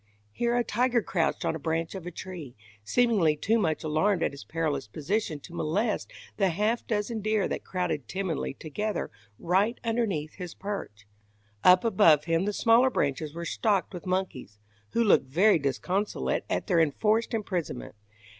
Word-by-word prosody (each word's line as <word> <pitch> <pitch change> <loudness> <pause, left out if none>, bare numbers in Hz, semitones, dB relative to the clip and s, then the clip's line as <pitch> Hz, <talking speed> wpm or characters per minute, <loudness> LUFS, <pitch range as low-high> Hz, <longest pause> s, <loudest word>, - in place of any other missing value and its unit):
Here 235 - 0
a 240 - +2
tiger 240 +1 +1
crouched 165 -4 0
on - - 0
a - - -5
branch 165 +2 -2
of 185 -3 -7
a - - -4
tree, 170 -7 -8 0.3
seemingly 205 - +3
too 225 +9 +2
much 160 -6 0
alarmed 165 +4 +1
at - - +1
his 140 0 -10
perilous 155 -6 -2
position 155 - -2
to 170 - -12
molest 200 +8 -1 0.3
the 195 -2 +3
half 210 +7 0
dozen 215 +1 -1
deer 215 -1 +1
that - - -4
crowded 180 -7 -2
timidly 185 -8 -3
together 205 +9 -3 0.3
right 195 +7 +1
underneath 220 -10 -1
his 180 -2 -8
perch. 195 - -6 0.6
Up 180 0 +7
above 165 -10 +5
him 165 +2 +1
the 210 - 0
smaller 230 +5 +4
branches 150 - -1
were 170 0 -5
stocked 200 0 0
with 180 0 -7
monkeys, 180 - -3 0.4
who 235 - +3
looked 195 - +4
very 180 +7 +4
disconsolate 180 +9 -1
at - - -1
their 180 -5 +2
enforced 215 - +2
imprisonment. 180 - -3
185 Hz, 165 wpm, -28 LUFS, 155-215 Hz, 0.6 s, Up